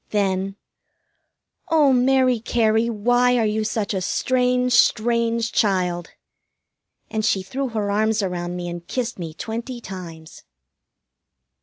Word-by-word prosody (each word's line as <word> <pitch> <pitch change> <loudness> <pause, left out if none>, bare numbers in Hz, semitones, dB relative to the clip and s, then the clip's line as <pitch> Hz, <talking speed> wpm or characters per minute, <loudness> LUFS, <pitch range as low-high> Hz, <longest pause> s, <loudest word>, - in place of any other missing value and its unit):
Then: 195 -1 -1 1.1
"Oh, 300 -4 +4
Mary 255 -1 +3
Cary, 225 0 +1
why 245 +3 +2
are 230 - +2
you 215 +1 0
such 215 -1 -2
a 190 - -1
strange, 250 +4 +1
strange 230 0 +2
child?" 180 -4 0 1.0
And 220 -1 -1
she 195 -2 +1
threw 270 +7 -3
her 215 -4 -2
arms 215 +1 +1
around 175 -1 -3
me 175 -1 -4
and 170 0 -7
kissed 240 -4 -3
me 165 -3 -6
twenty 235 +6 -5
times. 170 -7 -9
220 Hz, 125 wpm, -22 LUFS, 190-245 Hz, 1.1 s, Oh